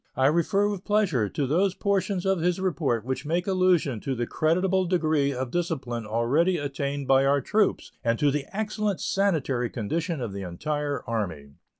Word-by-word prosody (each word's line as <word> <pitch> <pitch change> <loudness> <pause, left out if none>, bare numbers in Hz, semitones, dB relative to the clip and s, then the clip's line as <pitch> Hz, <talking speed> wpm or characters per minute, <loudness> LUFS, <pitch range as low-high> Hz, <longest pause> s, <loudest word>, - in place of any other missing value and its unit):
I 130 - +3
refer 170 +7 +3
with 200 -3 -3
pleasure 180 - +1
to 140 - -1
those 180 +7 +1
portions 200 -2 0
of 190 -2 +2
his 175 +2 +1
report 150 - 0
which 130 +2 -3
make 170 +4 -1
allusion 185 - +2
to 135 +4 -3
the 120 0 -1
creditable 185 +7 +1
degree 155 -5 +1
of 130 -2 -4
discipline 130 -10 -2
already 135 - +2
attained 140 -1 -3
by 135 0 +5
our 140 +1 +3
troops 205 - 0
and 115 0 +1
to 145 +2 +3
the 145 0 -2
excellent 210 -1 -2
sanitary 145 -11 0
condition 160 - -2
of 115 -6 -4
the 100 - -5
entire 145 - -3
Army. 90 -11 -3
150 Hz, 175 wpm, -26 LUFS, 130-185 Hz, -, by